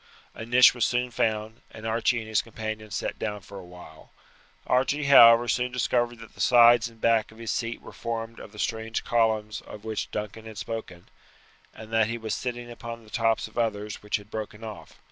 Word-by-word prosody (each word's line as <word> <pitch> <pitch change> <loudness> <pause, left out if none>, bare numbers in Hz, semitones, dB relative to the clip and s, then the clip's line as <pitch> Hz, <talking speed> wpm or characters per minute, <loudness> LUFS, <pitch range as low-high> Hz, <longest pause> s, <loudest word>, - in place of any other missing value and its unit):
A 115 - -8
niche 125 +1 +7
was 120 -2 -1
soon 125 +1 0
found, 110 0 -1
and 110 0 -11
Archie 115 +2 +1
and 110 - -9
his 110 -1 +2
companion 110 -1 -6
sat 95 - -4
down 105 -1 -3
for 100 +1 -10
a - - -10
while. 90 -3 -14 0.6
Archie, 135 +4 +1
however, 120 -4 +8
soon 125 +2 0
discovered 120 -1 0
that 115 - -13
the - - -8
sides 120 -1 +6
and 115 -1 -20
back 115 -1 +2
of 110 - -17
his 115 -1 -4
seat 115 -1 -3
were - - -10
formed 115 0 -5
of - - -11
the 105 - -15
strange 110 +1 -2
columns 110 -2 0
of 105 0 -12
which 110 -1 -3
Duncan 105 +1 -6
had 110 -1 -10
spoken, 100 -7 -6 0.6
and 110 +1 -12
that 110 -1 +4
he 115 +1 -3
was 110 -1 -4
sitting 120 -1 -4
upon 115 0 -8
the 110 - -18
tops 115 -2 +1
of 110 - -6
others 105 -2 -2
which 105 - -2
had 105 +1 -6
broken 110 0 -6
off. 110 -2 -9
115 Hz, 205 wpm, -26 LUFS, 110-120 Hz, 0.6 s, however